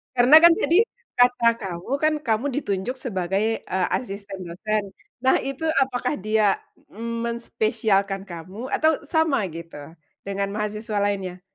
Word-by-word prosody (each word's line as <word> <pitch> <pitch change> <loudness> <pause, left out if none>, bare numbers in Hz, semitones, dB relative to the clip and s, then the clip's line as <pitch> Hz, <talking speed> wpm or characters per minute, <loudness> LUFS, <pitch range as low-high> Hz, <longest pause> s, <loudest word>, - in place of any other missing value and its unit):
Karena 250 +4 +7
kan 340 0 +8
tadi, 340 - +2 0.4
kata 245 -1 +4
kamu 185 +1 -6
kan 310 0 +4
kamu 225 +2 +1
ditunjuk 200 -1 -2
sebagai, 195 -5 -1 0.2
eee, 185 -1 0
asisten 200 -4 -7
dosen 210 +4 -2 0.3
nah 260 +2 +3
itu 275 +4 -3 0.2
apakah 255 +1 -2
dia 215 -2 +2 0.4
menspesialkan 220 -3 -1
kamu? 190 +6 -8
Atau 315 -1 +2
sama 315 -5 +1
gitu, 165 0 -9 0.5
dengan 200 0 -2
mahasiswa 210 0 -3
lainnya? 190 -3 -2
215 Hz, 125 wpm, -24 LUFS, 195-250 Hz, 0.5 s, kan